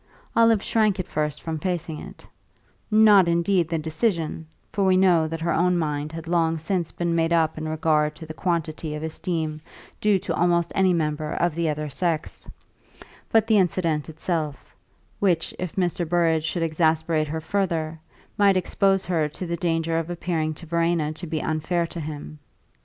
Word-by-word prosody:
Olive 230 -2 +4
shrank 215 -3 +2
at 185 - -2
first 150 -1 -2
from 160 -1 -3
facing 170 -3 -3
it - - -11 0.6
not, 210 -4 +6
indeed, 170 0 +2
the 165 - 0
decision 160 0 -1 0.3
for 200 - +1
we 190 -1 +4
know 175 -4 +4
that 165 +1 -5
her 170 0 0
own 180 +2 +2
mind 150 -2 -2
had 165 0 -7
long 165 -1 +1
since 170 +1 -2
been 170 -1 -1
made 165 0 +1
up 160 -2 +2
in 155 0 -4
regard 155 -1 +1
to 160 +1 -9
the 155 - -7
quantity 160 -3 -2
of 150 - -5
esteem 160 -1 -3 0.4
due 210 -2 +4
to - - -3
almost 170 -1 +2
any 190 -1 +3
member 155 -2 -1
of 175 -2 +1
the 165 0 0
other 150 0 -2
sex 160 +2 -3 0.8
but 225 -1 +4
the 220 -2 +4
incident 170 -4 0
itself, 160 -3 -4 0.4
which, 175 -5 +1
if 180 -2 -4
Mr. 175 -3 -1
Burrage 165 -2 +2
should 170 +1 -1
exasperate 160 -1 +1
her 160 +2 -3
further, 165 -2 -1 0.4
might 200 -2 +5
expose 195 +1 +1
her 160 -4 0
to 170 +5 -6
the 170 0 -2
danger 165 -1 0
of 165 +1 -5
appearing 165 -3 -2
to 170 - -10
Verena 165 -2 0
to 175 +3 -6
be 155 -1 -2
unfair 170 +2 0
to 170 - -7
him. 150 -1 -7
165 Hz, 175 wpm, -24 LUFS, 155-180 Hz, 0.8 s, not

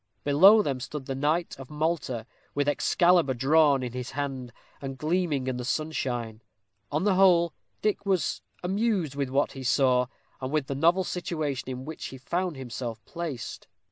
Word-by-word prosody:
Below 190 +10 +7
them 135 -6 -1
stood 140 +2 -6
the 135 - -3
knight 150 +5 0
of 135 - -9
Malta, 150 -7 -2 0.3
with 145 0 +1
Excalibur 170 -1 +3
drawn 140 +1 +4
in 120 -1 -4
his 125 -1 -4
hand, 135 -4 -3 0.3
and 135 -1 -5
gleaming 155 -2 0
in 130 -1 -2
the 125 - -4
sunshine. 120 -5 -2 0.5
On 150 +4 0
the 205 -1 +3
whole, 180 -3 +5 0.3
Dick 210 -1 +1
was 190 -3 0 0.2
amused 190 - 0
with 140 -2 -2
what 135 +2 +1
he 135 - -8
saw, 130 -1 +3 0.3
and 130 +1 -3
with 155 -3 +1
the 140 - -3
novel 170 +7 +3
situation 155 -8 -3
in 130 0 -5
which 160 +1 -6
he 130 - -9
found 175 +5 -2
himself 120 -3 -6
placed. 165 -8 -6
145 Hz, 170 wpm, -27 LUFS, 130-170 Hz, 0.5 s, Below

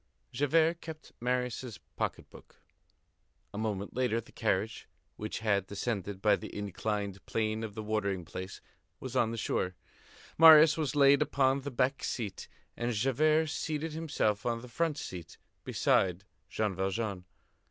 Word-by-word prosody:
Javert 160 +6 +2
kept 160 -1 -9
Marius' 125 -3 -2 0.2
pocket - - -3
book. - - -16 0.9
A - - -6
moment 105 -2 -3
later, 125 -3 +1
the 115 - -12
carriage, 105 0 -1 0.3
which 105 +1 -5
had 100 -3 +1
descended 100 -2 -3
by 105 - +5
the - - -8
inclined 100 0 -3
plane 110 0 -1
of 105 -2 -6
the 110 - -5
watering 100 -4 -1
place, 95 +3 -7 0.4
was - - -7
on 115 - +3
the 115 - -4
shore. 90 -4 -1 0.6
Marius 160 -1 +9
was 150 -3 -2
laid 140 -1 +6
upon 135 0 +2
the 140 - -4
back 130 +1 0
seat, 110 -6 -4 0.3
and 120 +1 -1
Javert 155 +7 +2
seated 155 0 -3
himself 145 -10 0
on 115 -1 -1
the - - -9
front 160 +4 -1
seat 85 - -7 0.3
beside 95 0 +1 0.3
Jean 105 -2 -1
Valjean. 95 0 -2
115 Hz, 145 wpm, -31 LUFS, 100-140 Hz, 0.9 s, Marius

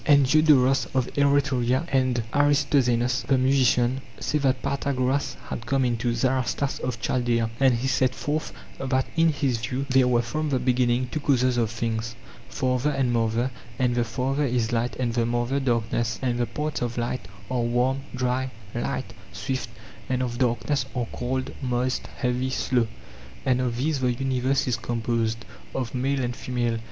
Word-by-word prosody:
And 140 -2 +5
Diodoros 135 -2 +4
of 130 -2 +3
Eretria 140 -1 +2
and 130 -3 +2
Aristoxenos 140 -4 +2
the 135 - +4
musician 130 -1 +3 0.2
say 150 - 0
that 130 -3 +1
Pythagoras 140 -1 0
had 115 - -5
come 135 0 +2
into 120 0 0
Zaratas 130 +2 0
of 125 -2 -3
Chaldaea; 115 -1 0
and 135 -2 +5
he 120 +3 -1
set 130 -1 +2
forth 155 +2 -2 0.3
that 130 0 0
in 165 0 +4
his 135 -5 0
view 125 +4 -2
there 130 -1 +5
were 120 -1 +3
from 155 +6 -2
the 135 - +2
beginning 125 0 +1
two 155 - -2
causes 130 -3 +2
of 115 -3 +1
things, 115 0 -3 0.3
father 130 +1 0
and 135 -4 +1
mother; 115 +2 +1 0.3
and 125 -1 +2
the 120 0 +2
father 130 +5 -1
is 120 -3 0
light 115 -2 0
and 120 -2 -1
the 120 0 +1
mother 120 +3 0
darkness; 115 -2 0
and 120 -2 0
the 120 - +1
parts 150 0 -3
of 120 -1 -2
light 120 -4 -2 0.2
are 125 -2 +1
warm, 125 +3 +1 0.2
dry, 125 +1 0 0.2
light, 120 - -3 0.2
swift; 130 -4 -3 0.4
and 130 0 +1
of 120 -1 -3
darkness 130 +2 +1
are 125 -2 0
cold, 130 +1 -2
moist, 125 0 -1
heavy, 125 0 0
slow; 125 -3 +1 0.6
and 125 -1 +2
of 120 -2 -1
these 140 +1 0
all 125 - +2
the 120 +2 -2
universe 130 +1 +1
is 125 -2 +1
composed, 115 -1 -1 0.3
of 125 -3 -2
male 135 +2 0
and 120 0 -2
female. 120 -3 -1
125 Hz, 170 wpm, -25 LUFS, 120-135 Hz, 0.6 s, And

